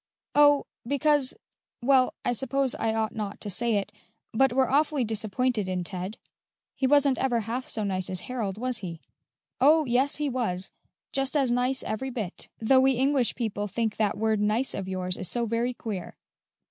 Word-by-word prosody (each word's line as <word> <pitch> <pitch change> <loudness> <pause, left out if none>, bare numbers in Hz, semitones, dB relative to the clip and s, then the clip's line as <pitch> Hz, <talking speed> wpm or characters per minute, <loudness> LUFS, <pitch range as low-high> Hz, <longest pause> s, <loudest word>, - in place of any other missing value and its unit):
"Oh, 290 -1 +5 0.2
because 285 0 +3 0.5
well, 260 0 +4
I - - +2
suppose 265 +2 0
I 225 - -1
ought 220 -1 -1
not 210 -3 -5
to 205 - -3
say 235 +3 +1
it, 200 0 -1 0.4
but 270 +3 +3
we're 260 +1 +2
awfully 290 -1 +2
disappointed 220 0 -1
in 185 -1 -2
Ted. 185 +3 -5 0.6
He 265 - +1
wasn't 280 -1 +4
ever 245 -3 +1
half 235 +4 -4
so 215 - -2
nice 185 -2 -1
as 185 -1 -2
Harold, 220 -6 -4
was 250 0 0
he?" 170 -5 -6 0.6
"Oh, 305 +3 +5
yes, 260 +3 +2
he 295 -1 -1
was 220 -8 -1 0.4
just 270 +2 0
as 265 -4 +2
nice 250 +2 +1
every 255 +5 -3
bit; 215 -7 -5
though 260 +4 +4
we 265 0 +4
English 265 0 +1
people 210 -3 -2
think 220 +1 -2
that 210 -2 +1
word 220 0 +1
nice 215 +5 +1
of 195 - -4
yours 185 -1 -2
is 185 - 0
so 240 -1 +1
very 235 +2 -1
queer. 205 -7 -6
240 Hz, 180 wpm, -27 LUFS, 210-265 Hz, 0.6 s, Oh